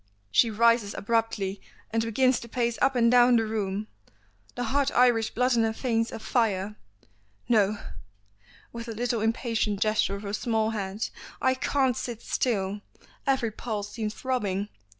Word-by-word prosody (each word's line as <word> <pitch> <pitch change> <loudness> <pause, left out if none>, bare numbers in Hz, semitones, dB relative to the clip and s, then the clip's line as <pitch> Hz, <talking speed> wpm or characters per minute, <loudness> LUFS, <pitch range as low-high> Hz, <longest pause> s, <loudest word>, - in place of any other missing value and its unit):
She 230 - +4
rises 230 -1 +3
abruptly 210 -3 -1 0.3
and 225 +1 +1
begins 255 +3 +2
to 235 - -10
pace 235 -1 0
up 270 - +3
and 235 -1 +4
down 245 0 +6
the 225 -1 +3
room, 210 -2 -2 0.7
the 245 - -2
hot 275 +4 +1
Irish 240 -3 +4
blood 250 +1 +1
in 230 - +3
her 225 0 +1
veins 230 -1 0
afire. 210 -3 -1 0.7
"No" 210 -3 +3 1.0
with 230 0 -6
a 225 - -5
little 235 0 -1
impatient 225 -2 0
gesture 215 -2 +1
of 200 - -8
her 200 0 -5
small 220 0 0
hand 205 0 -3 0.3
"I 260 - +3
can't 260 -1 +1
sit 235 -1 -5
still. 205 -4 -1 0.5
Every 260 -5 +1
pulse 210 -2 -4
seems 215 -2 -4
throbbing. 210 -6 -2
225 Hz, 150 wpm, -27 LUFS, 210-245 Hz, 1.0 s, down